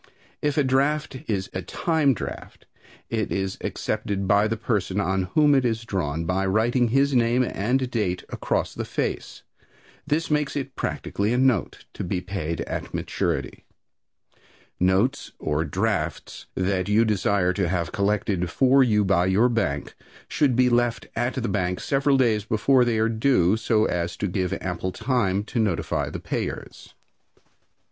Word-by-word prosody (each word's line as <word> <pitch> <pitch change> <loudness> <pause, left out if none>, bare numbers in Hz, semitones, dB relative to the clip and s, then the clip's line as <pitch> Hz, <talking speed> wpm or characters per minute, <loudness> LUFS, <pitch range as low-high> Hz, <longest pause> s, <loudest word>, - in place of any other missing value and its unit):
If 145 0 0
a 150 - +4
draft 140 +3 +1
is 95 -4 -2
a 95 - -3
time 155 - +1
draft - - -8 0.5
it 110 -3 -1
is 95 -1 -2
accepted 100 -1 -2
by 100 +2 +4
the 115 +1 -2
person 105 -4 -1
on 95 -1 0
whom 150 -2 +5
it 135 -2 +3
is 115 -2 -1
drawn 85 -6 -2
by 90 +3 0
writing 120 +5 +2
his 135 +4 +2
name 120 +1 +3
and 125 +4 0
date 95 -7 -1
across - - -2
the - - -4
face. - - -4 0.6
This 155 +2 0
makes 150 -1 0
it 135 -2 -4
practically 105 +3 -2
a - - +1
note, 130 -6 +1
to - - -5
be 90 +1 -2
paid 90 -3 -4
at - - -5
maturity. - - -2 1.2
Notes 95 +10 +1
or 75 0 -1
drafts 90 0 -2
that 95 0 0
you 110 +3 +4
desire 100 -3 +1
to 90 -2 0
have 85 -2 -1
collected 100 -3 0
for 135 +6 +4
you 105 -4 +2
by 90 -2 +2
your 105 +6 +3
bank 75 -12 -1 0.3
should 140 -5 +1
be 125 +1 +4
left 120 -2 +1
at 120 +2 -1
the 125 -3 -2
bank 90 -2 -1
several 140 0 +2
days 115 -5 +2
before 115 +5 +3
they 120 -2 +1
are 110 +1 +2
due, 110 -5 +2
so 110 -1 +2
as 85 0 -2
to 100 - -1
give 90 -1 -1
ample 90 0 -3
time 100 -3 0
to 115 - -4
notify 105 -6 0
the - - -6
payers. - - -5
105 Hz, 160 wpm, -24 LUFS, 95-125 Hz, 1.2 s, whom